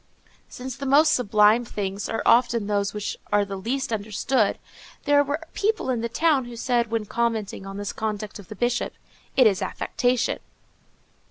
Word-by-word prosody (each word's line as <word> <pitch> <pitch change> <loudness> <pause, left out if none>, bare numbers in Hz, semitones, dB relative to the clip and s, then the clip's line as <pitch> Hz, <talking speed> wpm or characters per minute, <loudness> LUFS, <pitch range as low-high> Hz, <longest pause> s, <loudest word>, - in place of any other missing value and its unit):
_ - - -32 0.2
Since 255 0 -7
the 275 - -4
most 300 +3 +5
sublime 215 0 +4
things 200 -3 -4
are 225 - -2
often 235 -2 +4
those 200 -1 0
which 210 -1 -4
are 205 0 +3
the 200 0 -5
least 245 +6 -2
understood, 215 +2 0 0.5
there 290 0 +4
were 285 +2 -2
people 420 -9 0
in 240 -3 -1
the 235 - -2
town 285 +1 +2
who 240 0 -9
said, 235 -1 0
when 225 -1 -1
commenting 220 -3 -2
on 195 0 -7
this 205 0 -4
conduct 215 -1 -4
of 195 - -12
the 215 - -8
Bishop, 240 +3 -1
_"It 255 - -1
is 200 -4 +3
affectation." 245 -1 0
230 Hz, 175 wpm, -24 LUFS, 205-255 Hz, 0.5 s, most